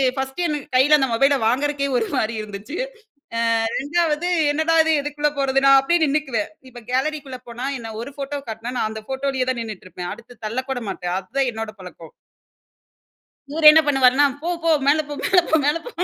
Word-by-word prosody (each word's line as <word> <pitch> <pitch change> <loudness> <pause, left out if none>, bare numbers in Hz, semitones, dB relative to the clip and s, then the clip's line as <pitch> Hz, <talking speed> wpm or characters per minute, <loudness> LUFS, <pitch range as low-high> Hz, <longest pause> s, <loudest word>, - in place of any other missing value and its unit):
First 265 +6 -3
எனக்கு 295 -3 -4
கையில 290 +4 +6
அந்த 270 - +2
மொபைல 275 +4 +3
வாங்குறக்கே 280 +3 0
ஒரு 225 -2 -1
மாதிரி 220 +1 0
இருந்துச்சு. 210 +6 -8 0.6
அ - - +1 0.4
2வது 315 +3 0 0.2
என்னடா 315 +2 +1
இது? 320 - +2
எதுக்குள்ள 295 +1 -1
போறது? 270 0 +1
நான் 275 0 +8
அப்படியே 335 +5 +1
நின்னுக்குவேன். 275 -7 -1 0.2
இப்ப 240 -1 -12
கேலரி 305 +4 0
க்குள்ள 260 -2 -9
போனா 240 +2 -5
என்ன 225 -1 -7
ஒரு 275 +4 -8
ஃபோட்டோ 285 0 -4
காட்னா 225 +3 -6
நான் 215 - 0
அந்த 220 0 -7
ஃபோட்டோலேயே 265 -1 -1
தான் 250 -2 -2
நின்னுட்டு 215 -5 -8
இருப்பேன். 180 -1 -6
அடுத்து 235 +2 -16
தள்ளக்கூட 255 +3 -3
மாட்டேன். 180 -2 -4
அதுதான் 250 +7 -1
என்னோட 220 -1 -5
பழக்கம். 175 -3 -12 1.4
இவர் 310 +1 +4
என்ன 320 +1 +6
பண்ணுவார்னா? 270 -1 +4 0.2
போ 335 - -3
போ 330 - +2 0.2
மேல 295 +2 +4
போ, - - -4
மேல 375 - +5
போ, 320 - +4
மேல 295 +3 +2
போ. 485 - -8
270 Hz, 185 wpm, -21 LUFS, 235-295 Hz, 1.4 s, நான்